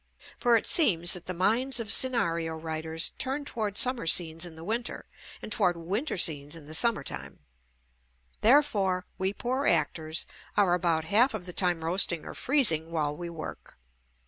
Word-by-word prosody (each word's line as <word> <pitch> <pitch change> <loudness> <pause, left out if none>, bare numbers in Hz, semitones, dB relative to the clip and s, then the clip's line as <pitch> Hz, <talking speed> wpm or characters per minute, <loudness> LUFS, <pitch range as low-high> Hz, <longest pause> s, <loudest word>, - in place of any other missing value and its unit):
For 240 -1 +4
it - - -3
seems 175 - +5
that 180 - -6
the 185 - -4
minds 240 +8 0
of 220 -3 -2
scenario 170 -12 +2
writers 160 0 -2
turn 275 +2 -2
toward 215 -6 -4
summer 250 -8 +3
scenes 165 0 +2
in 165 - -12
the 160 - -11
winter 230 +6 -4 0.4
and - - -8
toward 175 -3 +2
winter 195 - -3
scenes 150 -3 +1
in 160 -3 -12
the 150 - -10
JUST 160 - +6
ME 235 - +4
summer 225 -11 -2
time; - - -8 1.0
therefore, 210 -8 +2
we 190 +1 -1
poor 255 +6 -3
actors 160 0 0 0.3
are 195 -4 +3
about 170 -3 0
half 225 +8 +2
of 190 -5 -7
the 180 - -8
time 175 -3 0
roasting 170 -1 +1
or - - -8
freezing 190 - 0
while 150 -3 -2
we 175 +2 -7
work. 165 -2 -9
180 Hz, 175 wpm, -27 LUFS, 165-230 Hz, 1.0 s, JUST